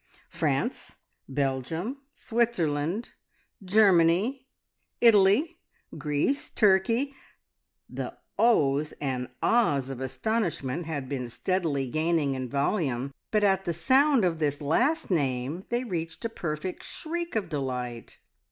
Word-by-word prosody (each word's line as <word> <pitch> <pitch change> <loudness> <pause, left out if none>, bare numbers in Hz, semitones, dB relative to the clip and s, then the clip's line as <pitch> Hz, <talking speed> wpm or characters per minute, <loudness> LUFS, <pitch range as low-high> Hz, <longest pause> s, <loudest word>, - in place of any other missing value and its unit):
France, - - -1 0.3
Belgium, 145 - -2
Switzerland, 195 - -1 0.5
Germany, 195 +5 +3 0.5
Italy, 230 - +4 0.4
Greece, 150 - -1
Turkey 230 +7 +2 0.4
" - - -56
The - - -4 0.2
"Ohs!" 150 -10 +3
and 130 -3 -3 0.2
"Ahs!" 145 - +2
of 130 -1 -6
astonishment 165 - -2
had 145 -5 -4
been 130 -3 -4
steadily 140 +3 -1
gaining 155 +1 +1
in 130 -1 -4
volume, 140 - -1 0.2
but 215 -1 +1
at 195 -1 +2
the 170 - 0
sound 265 - +4
of 165 -3 0
this 145 -2 0
last 240 - +1
name 140 +2 -1
they 240 +1 0
reached 165 -5 -4
a - - 0
perfect 170 -3 -4
shriek 340 0 -5
of 215 -3 0
delight. 125 -5 -4
170 Hz, 115 wpm, -27 LUFS, 140-225 Hz, 0.5 s, Italy